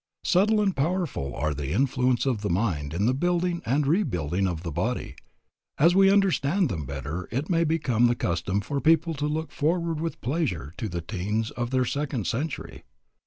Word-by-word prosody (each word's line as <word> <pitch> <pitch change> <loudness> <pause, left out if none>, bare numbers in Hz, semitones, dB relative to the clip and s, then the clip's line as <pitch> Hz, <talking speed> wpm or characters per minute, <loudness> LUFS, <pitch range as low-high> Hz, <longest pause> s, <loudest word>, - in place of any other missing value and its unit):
Subtle 210 +4 +3
and 195 -3 +1
powerful 155 - -1
are 75 +2 -1
the 70 0 -4
influences 125 +1 +1
of 125 -6 0
the 105 - -2
mind 85 -7 0
in 90 +6 0
the 125 - +3
building 175 +3 0
and 140 +5 +2
rebuilding 95 - +1
of 85 -2 -4
the 85 - -4
body. - - -2 0.6
As 165 +5 +5
we 195 +1 +6
understand 190 -4 +2
them 80 -7 -4
better 70 +6 -5
it 140 +8 -2
may 165 -1 +3
become 145 -8 +2
the 120 - +2
custom 90 +1 -1
for 140 +7 -3
people 165 +1 +3
to 150 0 -2
look 160 +1 -3
forward 165 +1 0
with 165 +1 -3
pleasure 120 - -2
to 110 -3 -3
the 85 -1 -3
teens 105 +5 -2
of 120 0 -3
their 130 0 +1
second 140 -4 -2
century. 145 +6 -3
130 Hz, 185 wpm, -26 LUFS, -, 0.6 s, we